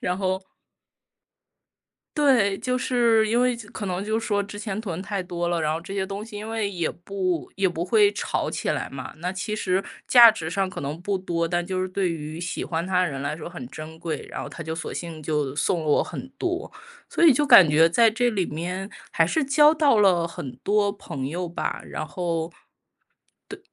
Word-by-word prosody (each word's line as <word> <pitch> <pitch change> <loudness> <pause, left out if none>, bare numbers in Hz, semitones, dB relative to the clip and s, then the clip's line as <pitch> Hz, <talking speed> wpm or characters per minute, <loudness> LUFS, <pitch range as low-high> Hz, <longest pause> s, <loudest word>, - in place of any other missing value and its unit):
然 180 0 -1
后 190 0 -1 1.8
对， 235 -10 +4
就 255 0 -1
是 235 -3 +3
因 235 +2 +2
为 250 -1 +2
就 225 -3 -11
可 205 - -6
能 185 +1 -2
就 220 +1 0
说 205 -2 0
之 205 +1 -9
前 210 -2 -4
囤 185 -5 -4
太 195 -1 -3
多 175 -1 -3
了， 170 -1 0
然 155 0 0
后 160 - -2
这 195 +3 -8
些 190 -1 -1
东 200 +2 -5
西 225 -2 -11
因 210 +1 -6
为 220 -3 -1
也 170 -4 -2
不 185 -2 -3
也 195 -1 +2
不 170 0 -3
会 415 - +4
炒 - - -2
起 - - -1
来 - - -3
嘛， - - -7
那 180 +2 -2
其 190 +3 -3
实 190 -2 0 0.3
价 240 -2 +10
值 165 -7 -3
上 195 +1 -1
可 - - -7
能 145 +4 -4
不 195 +1 -1
多。 170 -2 -1
但 175 +1 -1
就 185 0 -2
是 185 - -1
对 185 -1 -1
于 155 0 -6
喜 175 0 -3
欢 165 +1 -2
他 185 -1 +1
的 180 - +2
人 135 -1 -5
来 145 +2 -3
说 155 - -7
很 150 -8 -8
珍 155 +1 -9
贵， 160 -2 -5
然 - - -5
后 - - -7
她 - - -9
就 160 0 -4
索 160 - -5
性 165 -3 -6
就 150 -3 -1
送 165 +3 +1
了 155 - -5
我 150 - +3
很 260 - -7
多。 360 +3 -2 0.4
所 - - 0
以 315 - +9
就 290 +4 +2
感 190 - +9
觉 160 +2 +5
在 225 +4 +5
这 245 +2 +1
里 195 -6 0
面 180 +5 -4 0.2
还 165 - +3
是 315 - 0
交 295 +2 +6
到 295 -7 +3
了 180 -5 +4
很 130 -6 -7
多 205 +3 +1
朋 135 -9 -6
友 175 +3 -3
吧， 170 - -3
然 155 - -5
后， 170 -1 -3 1.0
对 - - -9
185 Hz, 240 characters per minute, -24 LUFS, 165-215 Hz, 1.8 s, 价